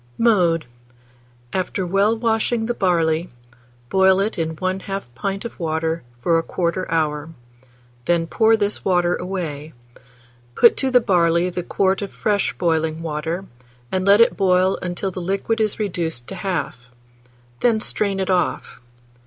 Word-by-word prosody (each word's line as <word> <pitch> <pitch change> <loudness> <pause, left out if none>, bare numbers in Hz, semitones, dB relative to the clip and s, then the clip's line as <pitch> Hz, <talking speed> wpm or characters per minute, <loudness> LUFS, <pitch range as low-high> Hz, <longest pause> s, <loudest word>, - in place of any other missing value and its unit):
Mode. 180 -8 +3 0.9
After 185 0 -2
well 200 +5 +2
washing 225 0 0
the 240 - -1
barley, 170 -4 +1 0.6
boil 190 0 +4
it 200 -1 -1
in 160 0 -2
1/2 190 +3 -3
pint 195 - -4
of 235 - -8
water 160 0 -1 0.2
for 165 -1 +3
1/4 175 +2 -2
hour; 155 -2 -1 0.8
then 170 -1 +2
pour 220 +6 +3
this 205 -1 -1
water 175 -2 +2
away; 160 -5 -5 0.8
put 235 - +6
to 265 - 0
the 250 -1 +4
barley 175 -3 +2
the 180 - -3
quart 190 +2 0
of 200 - -5
fresh 205 -2 0
boiling 160 -1 0
water, 160 +4 -3 0.5
and 185 0 0
let 200 +3 +6
it 230 - +4
boil 185 0 +2
until 180 +2 -3
the 185 - -6
liquid 200 +5 -1
is 215 -2 0
reduced 170 - -3
to - - -6
half; 185 -8 -3 0.8
then 230 -3 +2
strain 200 -2 -1
it 190 0 0
off. 180 -1 -1
185 Hz, 145 wpm, -21 LUFS, 165-200 Hz, 0.9 s, put